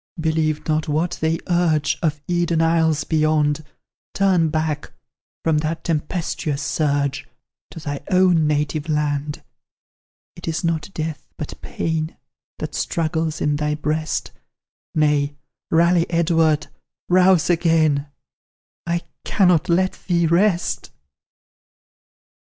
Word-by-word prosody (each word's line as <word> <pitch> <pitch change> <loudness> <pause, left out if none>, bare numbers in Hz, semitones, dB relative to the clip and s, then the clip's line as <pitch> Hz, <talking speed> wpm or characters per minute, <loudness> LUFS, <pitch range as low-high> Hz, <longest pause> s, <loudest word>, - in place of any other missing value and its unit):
Believe 160 -1 0
not 155 0 0
what 155 +4 -1
they 160 +1 +1
urge 170 -4 +1
Of 155 -3 0
Eden 175 -2 +1
isles 160 -2 +2
beyond; 155 -1 +1 0.5
Turn 185 -5 +3
back, 155 -1 -2 0.5
from 160 -2 +2
that 160 +2 -3
tempestuous 155 -2 -2
surge, 140 -3 0 0.4
To - - -9
thy 145 -2 -4
own 180 -4 +4
native 150 +1 -1
land. 150 -1 -1 0.9
It - - -10
is 165 +1 -2
not 165 0 -1
death, 155 -2 -4
but - - -5
pain 160 0 -3 0.4
That - - -5
struggles 160 -1 -1
in 150 -1 +1
thy 150 0 0
breast 155 +1 -2 0.6
Nay, 150 -2 +2 0.3
rally, 170 +1 +3
Edward, 165 -2 +2 0.4
rouse 180 -2 +4
again; 160 -4 +2 0.8
I 170 0 0 0.2
cannot 180 -6 +3
let 185 +2 +2
thee 170 -2 +2
rest!" 175 +2 +1
160 Hz, 110 wpm, -21 LUFS, 150-170 Hz, 0.9 s, own